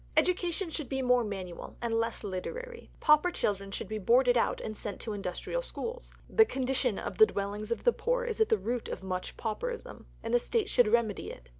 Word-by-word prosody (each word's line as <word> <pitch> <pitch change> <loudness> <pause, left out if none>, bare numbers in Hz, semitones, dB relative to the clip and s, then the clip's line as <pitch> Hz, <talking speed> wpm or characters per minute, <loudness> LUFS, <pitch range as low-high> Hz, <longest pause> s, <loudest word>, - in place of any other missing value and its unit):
Education 360 -1 +1
should 305 -5 -4
be 265 -1 -1
more 250 -1 +4
manual, 190 -5 -6
and 235 -1 -2
less 230 0 0
literary. 465 - -5
Pauper 300 +3 +5
children 200 - -1
should 195 - -4
be 215 +1 -3
boarded 245 +4 +4
out 235 - +2
and 215 - -5
sent 205 -1 -5
to 220 - -4
industrial 200 - -3
schools. - - -6 0.2
The 445 - +6
condition 260 - 0
of - - -5
the 435 - +9
dwellings 205 - -3
of 235 - -2
the 485 - +5
poor - - 0
is 465 -2 -2
at 440 - +4
the - - +4
root 230 +5 -2
of - - -5
much 185 -1 -4
pauperism, 465 - -4 0.2
and 230 - -3
the 245 - +6
State 425 - 0
should 245 -3 +4
remedy 220 -2 +1
it. 60 0 -11
240 Hz, 205 wpm, -30 LUFS, -, 0.2 s, the